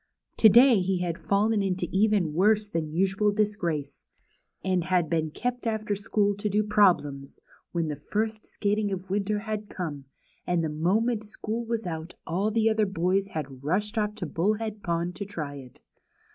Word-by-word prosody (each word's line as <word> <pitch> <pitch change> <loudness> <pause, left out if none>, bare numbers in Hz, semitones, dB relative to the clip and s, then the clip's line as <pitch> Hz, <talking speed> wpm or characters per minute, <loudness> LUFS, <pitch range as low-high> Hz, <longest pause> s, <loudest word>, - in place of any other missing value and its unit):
To 220 - +8
day 240 +1 +7
he 185 0 0
had 170 -1 -2
fallen 210 +2 +2
into 185 -2 -1
even 195 -5 +2
worse 210 +5 +3
than 165 -5 -3
usual 195 +5 +2
dis 210 0 +1
grace, 155 -8 -3 0.6
and 185 -2 0
had 180 -3 +1
been 160 -2 +1
kept 245 +8 -3
after 215 -2 -1
school 205 0 +1
to 210 +1 -1
do 210 +2 +2
problems, 175 -10 +2 0.3
when 170 -2 -1
the 150 - -2
first 215 +5 -3
skating 205 0 -1
of 190 -1 -2
the 190 - -13
winter 205 +1 0
had 215 -1 -4
come, 150 -7 -5 0.4
and 175 -2 +1
the 160 - -1
moment 210 +9 +1
school 220 +2 -4
w^as 230 -2 -2
out 165 0 -5
all 190 +6 0
the 220 0 +2
other 220 -1 +2
boys 190 +1 0
had 140 -7 -6
rushed 205 - 0
off 210 -1 0
to 205 -5 -4
Bullhead 210 +6 -1
Pond 170 0 -1
to 205 - -3
try 155 -8 -5
it. 130 -3 -13
200 Hz, 180 wpm, -27 LUFS, 170-215 Hz, 0.6 s, To